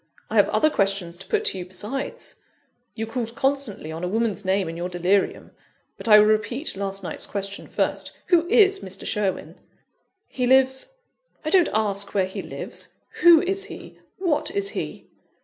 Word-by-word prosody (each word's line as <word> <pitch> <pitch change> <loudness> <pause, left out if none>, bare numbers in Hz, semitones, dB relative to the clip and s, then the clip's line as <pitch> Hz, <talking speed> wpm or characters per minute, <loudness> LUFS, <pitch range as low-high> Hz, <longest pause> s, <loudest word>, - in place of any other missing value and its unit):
I - - -2
have - - +5
other 310 0 +3
questions 195 -6 0
to 190 - -11
put - - 0
to 190 - +1
you, 180 - -5
besides 210 +9 -5 0.6
you 225 - -3
called 230 0 -4
constantly 270 - -1
on 165 +2 -6
a - - 0
woman's 215 0 -1
name 190 -1 +1
in 165 - -5
your 175 +2 -4
delirium. 180 +3 0 0.4
But - - -7
I 210 -1 +9
will 210 - +7
repeat 215 +7 0
last 195 0 -3
night's - - -4
question 200 0 -5
first - - -1 0.2
who 345 -2 +4
is 395 -1 +5
Mr. 190 +1 -6
Sherwin?" 205 -3 -2 0.7
"He 250 -2 -2
lives 265 - +4 0.3
" - - -34
"I 310 - -1
don't 365 -2 +5
ask 200 -2 -1
where 190 -2 +3
he 190 - -6
lives. - - -6 0.3
Who 340 -2 +8
is 385 +2 -1
he? - - -11 0.2
What 340 -6 0
is 400 0 -1
he?" - - -6
215 Hz, 180 wpm, -24 LUFS, 195-285 Hz, 0.7 s, I